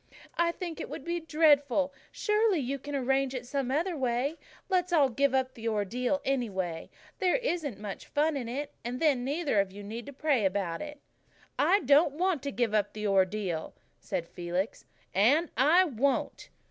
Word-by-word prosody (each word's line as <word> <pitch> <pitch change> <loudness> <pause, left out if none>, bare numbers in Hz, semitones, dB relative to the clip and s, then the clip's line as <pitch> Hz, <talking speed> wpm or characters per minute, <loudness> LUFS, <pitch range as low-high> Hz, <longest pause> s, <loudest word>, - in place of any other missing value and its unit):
"I 340 0 +2
think 340 -2 -6
it - - -6
would - - -7
be 345 0 -1
dreadful. 290 -4 +3 0.2
Surely 425 -2 +2
you 275 -1 -2
can 290 +2 -6
arrange 270 0 +1
it 250 -1 -5
some 270 0 -2
other 330 +6 0
way. 260 +3 -1 0.3
Let's 365 -2 +1
all 295 -6 +4
give 275 +2 +1
up 260 -1 0
the 230 -2 -6
Ordeal, 240 +6 0
anyway. 190 -11 -2 0.3
There 370 -3 +3
isn't 350 - -2
much 205 -1 -7
fun 300 +1 +1
in 245 -4 -3
it. 280 +4 -4
And 245 +1 -4
then 285 -6 +2
neither 285 -4 0
of 195 -1 +1
you 205 +1 -9
need 225 +5 -7
pray 285 -8 +2
about 190 -3 -1
it." 295 -1 -7 0.6
"I 400 - +4
don't 285 +2 +4
want 355 -1 0
to 280 - -3
give 240 -4 0
up 205 -1 +1
the 215 0 -5
Ordeal," 190 -3 0 0.2
said 170 - -4
Felix, 180 +5 -3 0.3
"and 280 - +3
I 315 +9 +5
won't." 275 -2 -1
270 Hz, 175 wpm, -29 LUFS, 220-310 Hz, 0.6 s, I